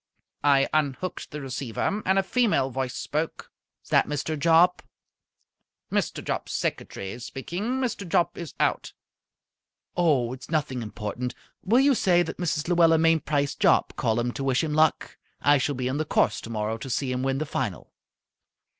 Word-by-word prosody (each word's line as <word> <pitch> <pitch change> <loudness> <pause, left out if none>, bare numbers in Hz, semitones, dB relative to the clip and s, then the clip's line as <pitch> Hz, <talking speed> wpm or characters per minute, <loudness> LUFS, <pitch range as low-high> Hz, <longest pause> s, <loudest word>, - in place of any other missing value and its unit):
I 140 -1 +4
unhooked 155 +3 -1
the 150 0 -6
receiver, 135 - -2
and 190 +1 +3
a 195 - +3
female 190 - +1
voice 130 0 -3
spoke. 155 +2 -3 0.3
"Is - - -19
that - - +4
Mr. 150 +2 -2
Jopp?" 165 +4 +4 1.1
"Mr. - - -1
Jopp's - - -3
secretary 100 +4 -3
speaking. 180 - -4
Mr. 230 -8 -3
Jopp 170 - +2
is 170 -3 -8
out." - - 0 1.0
"Oh, 140 -9 +2
it's 130 - -10
nothing 145 -6 -1
important. 115 +3 -5 0.3
Will 225 +7 +3
you 280 0 +5
say 175 -7 +3
that 160 - -6
Mrs. 160 -3 -1
Luella 170 -2 +5
Mainprice 155 -3 +2
Jopp - - +2
called 110 0 0
up 120 +1 -1
to 140 - -4
wish 135 +2 +1
him 155 -2 -2
luck? 155 0 +1 0.2
I 145 0 +4
shall 140 +2 -1
be 125 0 -2
on 130 +2 -1
the 155 - 0
course - - +1
tomorrow 110 0 -3
to 135 - -7
see 130 +1 -1
him 125 0 -1
win 135 0 0
the 155 - -2
final." - - -4
145 Hz, 165 wpm, -26 LUFS, 130-170 Hz, 1.1 s, you